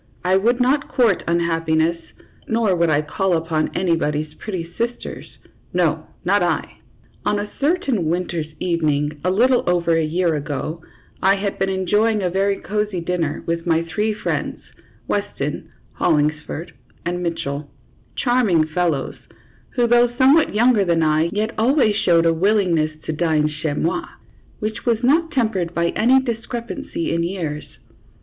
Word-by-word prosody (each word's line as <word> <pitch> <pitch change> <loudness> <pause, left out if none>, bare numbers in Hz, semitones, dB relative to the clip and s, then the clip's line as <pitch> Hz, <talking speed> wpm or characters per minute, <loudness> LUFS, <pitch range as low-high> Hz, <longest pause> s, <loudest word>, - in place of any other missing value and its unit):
I 185 +1 +3
would 235 +6 +2
not 265 +3 +2
court 240 -7 +2
unhappiness, 165 -1 +1 0.5
nor 225 -4 +2
would 170 -1 +2
I 150 0 +2
call 190 +5 -1
upon 160 -1 -1
anybody's 155 -4 0
pretty 175 -5 -6
sisters 235 +1 -5 0.4
no, - - +1 0.2
not - - +3
I. - - -1 0.4
On 205 0 +1
a 205 0 -4
certain 275 - +1
winter's 170 -1 -1
evening, 150 -4 0
a 180 - +1
little 245 +7 +3
over 170 -2 +2
a 165 - +2
year 170 +2 +1
ago, 150 +2 -4 0.4
I 195 +1 +4
had 200 0 -3
been 195 - +1
enjoying 205 +3 +1
a 180 - 0
very 195 +2 +1
cozy 210 -2 -2
dinner 170 -3 -2
with 170 +1 -2
my 165 0 +2
three 215 +1 +1
friends, 215 - -3 0.4
Weston, - - -3 0.2
Hollingsford, 150 +2 0 0.3
and 175 +1 -2
Mitchell, 150 -4 -3 0.5
charming 235 -11 +2
fellows, 155 -3 -1 0.6
who, 245 -2 +3
though 240 +1 +4
somewhat 270 0 +4
younger 235 -1 +4
than 170 -3 +2
I, 155 +1 +2
yet 215 +2 -1
always 240 -2 +3
showed 170 -5 +3
a 165 - +4
willingness 175 -3 +2
to 160 - -3
dine 155 -1 +1
chez 150 0 -3
mot, 345 - -1 0.5
which 215 +1 -4
was 235 -1 0
not 320 +6 +3
tempered 215 - -1
by 170 0 +1
any 250 +8 +4
discrepancy 245 +6 -4
in 170 - 0
years. 170 -4 -3
180 Hz, 145 wpm, -21 LUFS, 165-225 Hz, 0.6 s, I